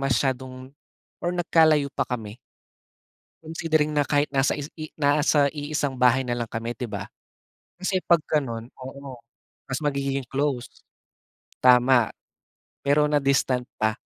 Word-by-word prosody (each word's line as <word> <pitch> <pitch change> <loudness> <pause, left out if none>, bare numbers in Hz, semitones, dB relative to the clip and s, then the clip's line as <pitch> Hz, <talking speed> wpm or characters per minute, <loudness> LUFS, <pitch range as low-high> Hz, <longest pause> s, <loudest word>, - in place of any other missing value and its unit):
masyadong 130 -1 -2 0.5
or 175 - 0
nagkalayo 160 -4 +3
pa - - 0
kami. 115 -3 -5 1.1
Considering 155 -1 0
na 145 - +3
kahit 145 +1 +1
nasa 135 +2 +2
is 145 - -4
i 155 -1 -7
nasa 145 0 +3
iisang 145 -2 -2
bahay 125 0 +3
na 120 - -1
lang 120 -2 -4
kami, 115 +1 -4
'di 120 -1 -6
ba? 100 -2 -5 0.7
Kasi 185 0 -1
'pag 170 -2 +4
gano'n, 120 -7 -1
oo, 135 0 -9 0.5
mas 135 +1 -3
magiging 140 -3 -2
close, 135 -3 -3 0.8
tama. 125 -2 +5 0.7
Pero 145 +1 +3
na-distant 140 -3 +2 0.2
pa 110 0 +1
140 Hz, 130 wpm, -25 LUFS, 125-150 Hz, 1.1 s, tama